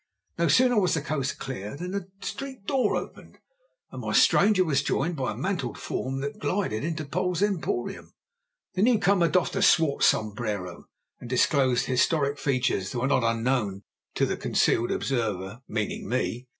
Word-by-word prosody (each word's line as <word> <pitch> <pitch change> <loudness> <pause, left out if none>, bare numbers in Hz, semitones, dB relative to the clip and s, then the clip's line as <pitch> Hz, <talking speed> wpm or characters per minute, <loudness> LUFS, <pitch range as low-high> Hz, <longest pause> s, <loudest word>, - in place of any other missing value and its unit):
No - - +3
sooner 250 -3 +4
was 180 -3 +2
the 155 - -1
coast 140 -3 -2
clear 125 -2 -6
than 180 +3 -5
the 195 -2 -4
street 265 -6 -6
door 255 -5 +1
opened, - - -7 0.5
and - - -7
my - - -3
stranger 200 -3 +5
was 140 -4 +2
joined 155 +3 -1
by 130 -3 -2
a - - -6
mantled 175 - -2
form, 135 +1 -3
that 140 +1 -5
glided 145 - -1
into 155 -1 -3
Poll's 180 +5 -1
emporium. 180 -11 -2 0.6
The 185 - -1
new 235 +2 +5
comer 195 -4 +3
doffed 175 +3 +1
a - - 0
swart 160 -5 +4
sombrero, 105 -5 0 0.3
and 120 - -9
disclosed 130 0 +2
historic 140 +2 +1
features 125 -8 0
that - - -3
were 125 - 0
not 135 -3 +2
unknown 115 -3 0 0.3
to - - +2
the - - -2
concealed 115 - +1
observer—meaning 110 -2 -3
me. 125 0 -2
140 Hz, 165 wpm, -26 LUFS, 120-180 Hz, 0.6 s, stranger